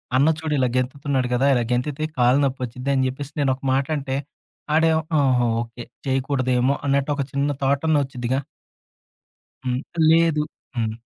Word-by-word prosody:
అన్న 140 +4 +5
చూడు 160 -2 -2
ఇలా 130 -1 +2
గెంతుతున్నాడు 130 0 0
కదా! 130 +3 +2
ఇలా 120 -2 +2
గెంతుతే 140 +5 -1
కాళ్ళు 125 +3 +4
నొప్పి 135 -1 0
వచ్చింది" 125 +3 -6
అని 130 -1 +2
చెప్పేసి 140 +3 -5
నేను 135 -2 +2
ఒక 135 - -21
మాట 135 +1 +2
అంటే. 135 -1 -3 0.6
వాడేమో 160 0 +3 0.2
ఆహా! 125 -3 +3 0.2
ఓకే. 120 0 -8 0.2
చేయకూడదేమో, 130 -1 +1
అన్నట్టు 140 +1 +1
ఒక 140 - -1
చిన్న 140 +1 0
థాట్ 140 +2 +1
అన్న 155 -2 +4
వచ్చుద్దిగా. 130 0 -2 1.3
హ్మ్. 125 0 0 0.3
లేదు 165 -2 +4 0.3
హ్మ్. 110 -1 -1
135 Hz, 155 wpm, -23 LUFS, 125-145 Hz, 1.3 s, అన్న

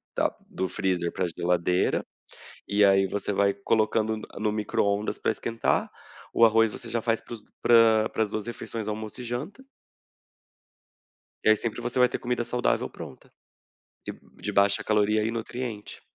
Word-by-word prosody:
da - - 0
do 95 0 -2
freezer 90 -2 -1
pra 90 - -1
geladeira 90 +1 +1 0.7
e 100 0 +4
aí 95 0 +4
você 100 +1 -2
vai 100 0 +3
colocando 110 +2 +1
n 110 - -8 0.2
no 105 0 0
micro-ondas 105 -1 -1
pra - - 0
esquentar, 115 +1 -1 0.4
o 115 - +6
arroz 115 -1 +5
você 120 - -6
já 115 - 0
faz 115 -1 +1
para 120 - -9
os 110 - -11 0.2
pra 115 -2 +5
para - - 0
as 105 - -7
2 110 +1 -3
refeições, 115 -2 -5
almoço 110 +2 -5
e - - -5
janta 125 - -5 1.8
e - - +3
aí 110 - +6
sempre 115 +1 -3
você 120 +1 -2
vai 125 - +6
ter - - -4
comida 120 -1 -2
saudável 120 +1 0
pronta. - - -11 0.7
De - - -3 0.3
de - - -2
baixa 100 0 +3
caloria 105 0 +2
e 110 - 0
nutriente. 115 -1 -5
110 Hz, 165 wpm, -26 LUFS, 100-115 Hz, 1.8 s, o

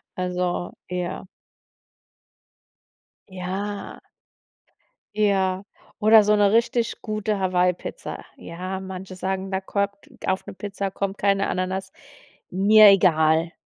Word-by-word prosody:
Also, 180 -1 -2 0.2
ja 180 0 -4 2.0
Ja. 190 +2 -5 1.1
Ja. 195 -3 +1 0.4
Oder 215 0 +7
so 210 +1 +3
'ne 205 -1 +4
richtig 235 +1 +1
gute 215 -1 -2
Hawaii 180 -1 +2
Pizza. - - -8
Ja, 185 +3 -6
manche 190 0 -8
sagen, 190 +1 -3
da 190 - -1
kommt 200 +1 -3 0.2
auf 190 0 0
'ne 200 - -7
Pizza 195 0 -4
kommt 195 +1 -3
keine 195 0 +2
Ananas. 185 +1 -3 0.6
Mir 210 +3 +7
egal, 165 -4 +4
190 Hz, 105 wpm, -23 LUFS, 185-205 Hz, 2.0 s, Oder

